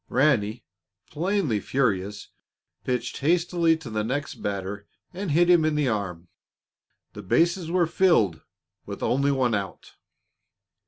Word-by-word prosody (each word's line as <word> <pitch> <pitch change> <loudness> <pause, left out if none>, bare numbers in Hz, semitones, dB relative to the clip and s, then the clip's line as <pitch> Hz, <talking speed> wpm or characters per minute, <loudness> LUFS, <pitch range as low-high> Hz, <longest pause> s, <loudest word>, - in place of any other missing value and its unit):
Ranny, 120 -4 +1 0.5
plainly 165 - 0
furious, 105 -6 -1 0.5
pitched 125 -2 -3
hastily 170 +1 +2
to 160 - -10
the 110 0 -1
next 140 +6 -4
batter 100 0 -4 0.3
and 190 +1 -4
hit 170 +4 +3
him 175 -2 +5
in 155 -1 +1
the 150 -3 +1
arm. 95 -6 -3 0.9
The - - -8
bases 170 - +1
were 175 0 +2
filled, 160 - +2 0.5
with - - -6
only 140 +2 +2
one 130 -4 +1
out. 100 -3 -5
135 Hz, 125 wpm, -25 LUFS, 105-170 Hz, 0.9 s, him